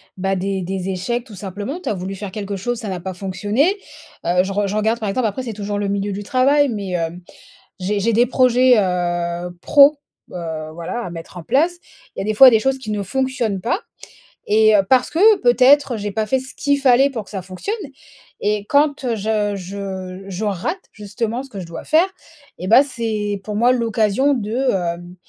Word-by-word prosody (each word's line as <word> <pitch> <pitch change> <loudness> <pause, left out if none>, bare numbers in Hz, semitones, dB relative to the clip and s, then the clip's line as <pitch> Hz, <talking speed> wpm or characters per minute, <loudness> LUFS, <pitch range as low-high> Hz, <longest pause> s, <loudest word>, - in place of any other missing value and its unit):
bah, 195 +1 -1
des 195 0 -2
des 190 +1 -4
échecs 215 +6 -2
tout 220 -6 -12
simplement. 205 - -5
Tu - - -4
as - - +1
voulu 190 0 -5
faire 200 0 -7
quelque 200 0 -5
chose, 240 +5 -3
ça 220 - -6
n'a 185 -2 -4
pas 190 +1 -5
fonctionné. 205 - 0 0.5
Heu, 180 +1 +3
je 195 +1 -4
re 205 0 0
je 200 - -3
regarde, 220 +2 +1
par 210 - -1
exemple, 235 +3 0
après 215 +5 -4
c'est 240 - -5
toujours 205 0 -4
le 200 -1 -1
milieu 200 0 -1
du 205 +1 -5
travail, 275 +5 +3
mais, 200 -4 -4
hem. 170 0 -3 0.6
J'ai 200 +2 -1
j'ai 230 +3 +1
des 235 +3 +4
projets, 255 0 +4
heu, 175 -2 -1
pro, 285 +1 +6 0.4
heu, 160 -3 -5
voilà 170 +8 -5
à 225 - -5
mettre 170 +1 -9
en - - -7
place. 310 - +1 0.4
Il - - -13
y - - -1
a - - -5
des 215 - 0
fois 260 +4 +9
des 225 -2 +3
choses 270 +2 +1
qui 255 -5 -7
ne 210 -1 -1
fonctionnent 250 -3 -1
pas 245 - 0 0.7
et, 215 0 +5
heu, 200 - +5
parce 255 -1 +3
que 410 +6 +5
peut-être 260 +1 +5
j'ai 205 0 -4
pas 220 +1 -1
fait 265 +5 +1
ce 260 0 -10
qu'il 285 -1 +1
fallait 270 +1 +4
pour 225 -5 -4
que - - -16
ça 195 -3 -5
fonctionne 185 - -4 0.7
et 210 0 0
quand, 285 -1 +2
heu, 235 -2 0
je 210 -1 -1
je 190 0 -6
je 195 +2 -5
rate 205 - -3
justement 225 +3 -4
ce 270 - -12
que 200 - -8
je - - -7
dois 165 0 -8
faire, 320 +3 +4 0.5
et 180 - -5
bah, 240 +7 +7
c'est 220 -6 -3
pour 210 - -4
moi 240 +4 +4
l'occasion 230 +3 +1
de, 220 -3 -3 0.2
hem, 175 -1 -3
210 Hz, 215 wpm, -20 LUFS, 190-255 Hz, 0.7 s, fois